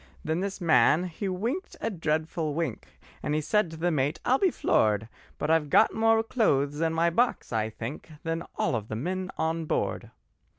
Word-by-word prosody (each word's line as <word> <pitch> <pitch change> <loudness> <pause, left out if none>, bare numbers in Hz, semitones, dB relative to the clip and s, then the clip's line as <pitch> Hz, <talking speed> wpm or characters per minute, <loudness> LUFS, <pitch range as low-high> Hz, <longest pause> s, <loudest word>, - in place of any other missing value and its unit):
Then 160 +2 -1
this 195 +1 -3
man 160 -1 +4
he 185 +3 -4
winked 235 - -3
a 225 - -2
dreadful 160 -3 -1
wink, 160 -9 -3 0.3
And 150 +1 -1
said 210 +3 +2
to 160 - -9
the 175 +2 +1
mate, 145 0 0
"I'll 260 +2 +3
be 385 - +4
floored: 110 - +1 0.3
But 150 - -1
I've 160 -3 +2
got 220 - +5
more 225 0 +3
clothes 145 - +1
in 165 -1 +2
my 165 +1 +2
box, 235 - 0
I 110 -1 0
think, 115 +8 -7
Than 165 0 -2
all - - 0
of 110 -2 -3
the 110 - -4
men 185 +9 -3
on 160 0 -1
board." - - -2
165 Hz, 185 wpm, -27 LUFS, 145-190 Hz, 0.3 s, got